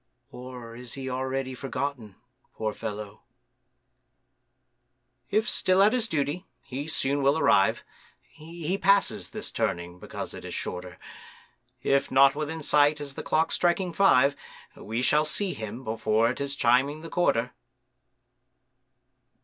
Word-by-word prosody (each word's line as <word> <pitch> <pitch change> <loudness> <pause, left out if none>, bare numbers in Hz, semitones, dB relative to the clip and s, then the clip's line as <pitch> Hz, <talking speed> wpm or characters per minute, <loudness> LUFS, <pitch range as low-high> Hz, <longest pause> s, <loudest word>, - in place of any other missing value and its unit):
Or 125 -2 -9
is 125 0 -7
he 130 -1 -5
already 130 0 -2
forgotten, 130 -5 -4 0.4
poor 110 -1 -2
fellow? 105 -1 -6 2.1
If 215 +3 +1
still 185 -3 +3
at 210 - +5
his 240 -3 +1
duty, 155 +3 -2 0.2
he 135 +3 -5
soon 140 -2 0
will 140 +3 +3
arrive,— 95 - +3 0.5
He 165 +4 -5
passes 200 +1 +2
this - - -5
turning, 85 +1 -2
because - - -6
it - - -9
is - - -6
shorter,— 90 0 -5 0.9
If 140 +1 +2
not 135 +1 +6
within 155 +2 -4
sight 150 +1 +4
as 145 -1 -5
the - - -6
clock's 160 +1 +1
striking 175 0 +1
five, 145 -7 +4 0.4
We 115 +3 -4
shall 150 +3 +4
see 185 +5 0
him 110 +4 -7
before 110 0 +1
it 130 - -6
is 140 0 -1
chiming 135 +4 +2
the 165 - -8
quarter. 125 -8 +1
140 Hz, 135 wpm, -27 LUFS, 120-160 Hz, 2.1 s, not